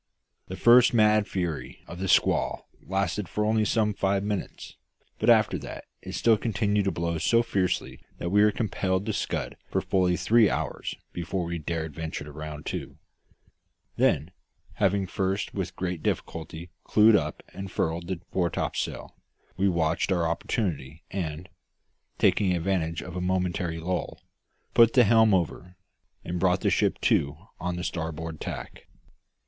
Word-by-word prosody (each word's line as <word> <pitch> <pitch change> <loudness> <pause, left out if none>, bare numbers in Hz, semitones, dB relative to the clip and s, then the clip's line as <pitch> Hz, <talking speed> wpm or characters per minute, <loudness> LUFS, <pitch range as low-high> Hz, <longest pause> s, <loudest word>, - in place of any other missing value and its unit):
The 95 - -6
first 120 +3 +6
mad 105 -1 +4
fury 85 -5 -4
of 85 - -9
the 95 - -2
squall - - +2
lasted 95 0 -2
for 105 - -1
only 110 0 +2
some 105 -1 +1
five 100 0 0
minutes; 105 -2 -4 0.4
but - - +2
after - - +4
that - - -8 0.2
it - - -8
still 115 -2 +4
continued 105 -2 0
to 95 - +1
blow 85 -1 -2
so 115 +8 +3
fiercely 95 -5 -1 0.2
that 85 - -3
we 105 +1 +5
were 105 - +6
compelled 95 -3 -1
to 110 - -1
scud - - -3
for - - +1
fully 90 -2 +1
three 110 +5 +4
hours - - -3 0.2
before 85 +2 -3
we 85 0 -3
dared 80 0 -3
venture 80 0 -5
to 75 - -10
round 75 0 -7
to. - - -5 1.0
Then, - - +2 0.4
having 100 -1 +1
first 95 +2 -2
with 95 -2 -4
great 90 -3 -3
difficulty 80 +2 -4
clewed 110 +1 +5
up - - -1
and 95 -1 -7
furled 85 +1 -1
the 90 -3 -4
fore 90 -2 +1
topsail, - - -3 0.4
we 95 +1 +2
watched 85 +1 0
our 85 -3 +2
opportunity 80 - -2
and, 85 -2 -4 0.7
taking 95 -3 +3
advantage 85 -2 -1
of 90 - -8
a 90 - -2
momentary 90 -2 -1
lull, 90 +2 -3 0.5
put 115 -1 +6
the 125 - +7
helm 110 -1 +5
over, 90 +1 -2 0.5
and 90 +1 -3
brought 90 0 +2
the - - +2
ship - - +1
to 70 +1 +2 0.2
on 90 0 -2
the 90 - -4
starboard 80 -2 -4
tack. - - -7
90 Hz, 155 wpm, -27 LUFS, 85-100 Hz, 1.0 s, the